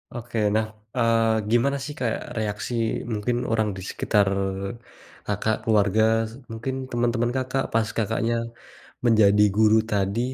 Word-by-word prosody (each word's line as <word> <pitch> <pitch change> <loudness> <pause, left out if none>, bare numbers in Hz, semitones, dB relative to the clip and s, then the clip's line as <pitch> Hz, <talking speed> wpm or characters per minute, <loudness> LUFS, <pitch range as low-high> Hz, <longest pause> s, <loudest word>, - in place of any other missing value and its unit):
Oke, 120 -1 -6 0.2
nah, 110 0 +2 0.3
eee, 115 -2 +2
gimana 135 +4 +2
sih 150 +1 -5
kayak 115 -3 -1 0.2
reaksi 105 +2 -3 0.4
mungkin 110 +3 -1 0.2
orang 110 -1 +2
di - - -6
sekitar 105 -2 +1 1.0
Kakak 105 +2 0
keluarga 105 -1 +3 0.5
mungkin 115 +4 -4 0.2
teman-teman 120 0 +1
Kakak, 135 +1 -1
pas 115 -1 +2
Kakaknya 115 +1 0 0.7
menjadi 105 -3 +5
guru 110 0 +5
tadi? 100 +1 0
115 Hz, 120 wpm, -24 LUFS, 105-120 Hz, 1.0 s, menjadi